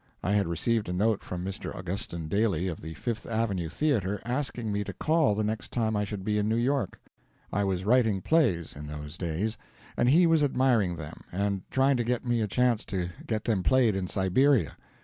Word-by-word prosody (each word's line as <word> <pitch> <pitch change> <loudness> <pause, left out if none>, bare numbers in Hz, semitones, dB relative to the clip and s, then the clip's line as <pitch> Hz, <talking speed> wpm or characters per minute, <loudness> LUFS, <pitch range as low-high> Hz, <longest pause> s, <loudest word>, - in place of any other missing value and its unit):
I 95 - 0
had 100 -3 +2
received 105 +5 0
a - - -2
note 105 +3 +1
from 90 0 -5
Mr. 95 +1 -5
Augustin 90 -3 -4
Daly 100 -2 +1
of 85 -4 -4
the 80 +1 -7
Fifth 115 -3 -4
Avenue 105 -7 -1
Theatre, 105 - 0
asking 120 -3 -2
me 100 0 -1
to - - -6
call 155 -8 +2
the 110 - 0
next 110 +1 -3
time 110 -3 0
I 105 0 +1
should 100 -1 -5
be 105 +1 0
in 105 +1 0
New 110 - +2
York. 120 -3 0 0.5
I 100 - +1
was 95 -1 -1
writing 110 -3 +3
plays, 105 - +1
in 75 +1 -8
those 75 +1 -7
days, 90 +6 -2 0.4
and 120 - +3
he 170 +6 +6
was 165 -2 +4
admiring 125 -10 +2
them 75 -3 -8
and 100 +1 -1
trying 135 0 +3
to 120 - 0
get 120 +1 -1
me 120 -1 +1
a 105 - 0
chance 120 +2 +2
to 90 -4 -2 0.2
get 110 -2 -1
them 105 -5 +1
played 120 0 +3
in 95 -1 -2
Siberia. 95 - +2
105 Hz, 210 wpm, -28 LUFS, 95-120 Hz, 0.5 s, he